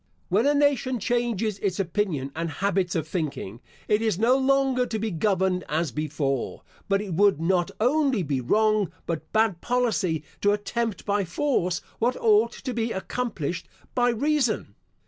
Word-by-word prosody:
When 210 +8 +3
a 290 - +3
nation 270 -3 +2
changes 230 -3 -1
its 195 -1 -1
opinion 170 -7 -1
and 165 +1 -2
habits 185 +2 0
of 160 -2 -1
thinking, 145 - -4 0.3
it 210 +1 +2
is 220 -6 +1
no 230 +5 +4
longer 265 -1 +2
to 220 - -2
be 220 0 -2
governed 185 +1 +1
as 155 -1 0
before; 140 -1 -2 0.3
but 195 +1 +2
it 195 -4 -5
would 195 -2 +4
not 175 +1 +1
only 260 -2 +2
be 140 -4 -1
wrong, 215 - +2
but 160 -2 -4
bad 215 -5 +2
policy, 215 -10 0 0.2
to 205 0 +4
attempt 220 +1 -2
by 205 -1 +1
force 180 - 0 0.2
what 245 +3 +1
ought 225 +1 +4
to 260 -2 -5
be 230 0 -1
accomplished 190 -6 -3 0.3
by 245 -1 +3
reason. 265 0 0
205 Hz, 160 wpm, -25 LUFS, 170-240 Hz, 0.3 s, no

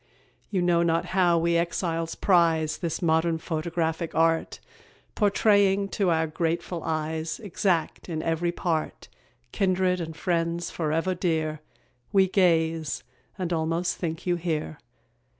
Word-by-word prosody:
You 185 -3 0
know 175 -1 +3
not 165 -1 +1
how 180 -3 +4
we 170 +1 +2
exiles 165 -1 -1
prize 165 -4 +2
This 170 +1 -3
modern 160 0 +2
photographic 160 0 -2
art, 165 0 +1 0.5
Portraying 200 -1 +3
to 195 -3 0
our 160 -1 +2
grateful 170 +2 -2
eyes, 160 +2 -2
Exact 185 -4 -1
in 155 -2 -3
every 165 +1 0
part, 165 -2 -3 0.4
Kindred 185 -2 +1
and 160 -1 -6
friends 170 0 -1
forever 165 +3 0
dear; 160 -4 -1 0.5
We 195 -1 +4
gaze, 165 -6 +1 0.3
and 180 -2 -2
almost 165 +2 0
think 165 -2 -4
you 175 -1 +1
here. 155 - -3
170 Hz, 125 wpm, -26 LUFS, 160-180 Hz, 0.5 s, how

